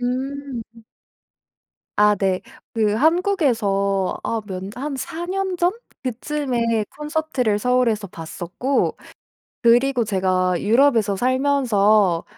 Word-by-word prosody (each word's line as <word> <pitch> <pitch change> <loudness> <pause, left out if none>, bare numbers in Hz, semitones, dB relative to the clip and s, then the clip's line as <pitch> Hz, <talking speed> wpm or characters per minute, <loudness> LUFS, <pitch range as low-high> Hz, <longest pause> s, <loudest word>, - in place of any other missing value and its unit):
음. 250 -2 -4 1.1
아 210 0 +5
네. 190 -2 0 0.3
그 215 -2 +1
한국에서 230 - +1
아 225 -1 -1
몇 185 -2 -5
한 280 +3 -4
4 335 +6 -5
년 380 -1 -1
전 350 +1 +3 0.3
그쯤에 245 -3 -1
콘서트를 300 -8 -1
서울에서 235 -3 +1
봤었고 180 - -2 0.7
그리고 245 +1 +4
제가 185 -3 +1
유럽에서 225 -3 +3
살면서 215 -8 +2
235 Hz, 190 characters per minute, -21 LUFS, 205-280 Hz, 1.1 s, 아